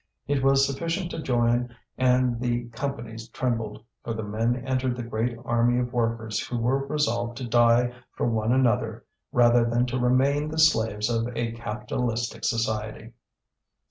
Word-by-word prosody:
It 140 Hz, -1 st, 0 dB
was 135 Hz, 0 st, +5 dB
sufficient 165 Hz, +6 st, -2 dB
to 160 Hz, -, -4 dB
join 120 Hz, -2 st, +1 dB, 0.2 s
and 125 Hz, -2 st, +2 dB
the 120 Hz, -1 st, -1 dB
companies 115 Hz, -3 st, -5 dB
trembled, 115 Hz, -4 st, -3 dB, 0.2 s
for 115 Hz, -, -3 dB
the 110 Hz, -, -4 dB
men 110 Hz, +3 st, 0 dB
entered 130 Hz, -1 st, 0 dB
the 120 Hz, -, -4 dB
great 115 Hz, +1 st, -2 dB
army 120 Hz, +1 st, +2 dB
of 125 Hz, 0 st, -3 dB
workers 115 Hz, -2 st, -1 dB
who 120 Hz, -, -3 dB
were 135 Hz, +4 st, 0 dB
resolved 120 Hz, -5 st, -1 dB
to 130 Hz, -2 st, -5 dB
die 120 Hz, +1 st, +4 dB, 0.2 s
for -, -, -1 dB
one 110 Hz, -1 st, 0 dB
another 115 Hz, -3 st, +1 dB, 0.3 s
rather 120 Hz, -2 st, +5 dB
than 120 Hz, +1 st, +1 dB
to 125 Hz, +1 st, -2 dB
remain 135 Hz, +4 st, +2 dB
the 160 Hz, -, -5 dB
slaves 110 Hz, -9 st, +3 dB
of 115 Hz, -1 st, 0 dB
a 115 Hz, -1 st, -1 dB
capitalistic 115 Hz, +1 st, -3 dB
society. 110 Hz, 0 st, -2 dB
120 Hz, 155 wpm, -26 LUFS, 115-130 Hz, 0.3 s, was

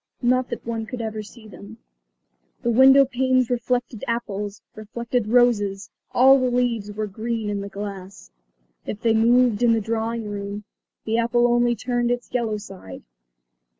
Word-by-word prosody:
Not 255 Hz, +1 st, +2 dB
that -, -, -6 dB
one 225 Hz, -1 st, -4 dB
could 250 Hz, -, -6 dB
ever 220 Hz, -1 st, -4 dB
see 215 Hz, +1 st, -13 dB
them. 205 Hz, +2 st, -12 dB, 0.9 s
The 240 Hz, -, +1 dB
window 265 Hz, +3 st, +7 dB
panes 255 Hz, -1 st, +1 dB
reflected 245 Hz, -1 st, -2 dB
apples, 210 Hz, -3 st, -4 dB
reflected 235 Hz, +2 st, -3 dB
roses; 205 Hz, -5 st, +2 dB, 0.2 s
all 270 Hz, +2 st, +6 dB
the 255 Hz, -1 st, +1 dB
leaves 240 Hz, -4 st, -1 dB
were 215 Hz, +1 st, -3 dB
green 220 Hz, +1 st, -4 dB
in 200 Hz, -1 st, -3 dB
the 200 Hz, -, -6 dB
glass. 195 Hz, -1 st, -8 dB, 0.6 s
If 210 Hz, -, -5 dB
they 230 Hz, -1 st, +3 dB
moved 235 Hz, 0 st, +3 dB
in 235 Hz, -1 st, +4 dB
the 225 Hz, -, +2 dB
drawing 225 Hz, +1 st, -3 dB
room, 205 Hz, 0 st, -5 dB, 0.4 s
the 225 Hz, +1 st, 0 dB
apple 240 Hz, +1 st, +2 dB
only 240 Hz, 0 st, +2 dB
turned 240 Hz, +1 st, -1 dB
its 245 Hz, 0 st, -3 dB
yellow 230 Hz, -4 st, -1 dB
side. 190 Hz, -, -11 dB
230 Hz, 155 wpm, -23 LUFS, 210-245 Hz, 0.9 s, window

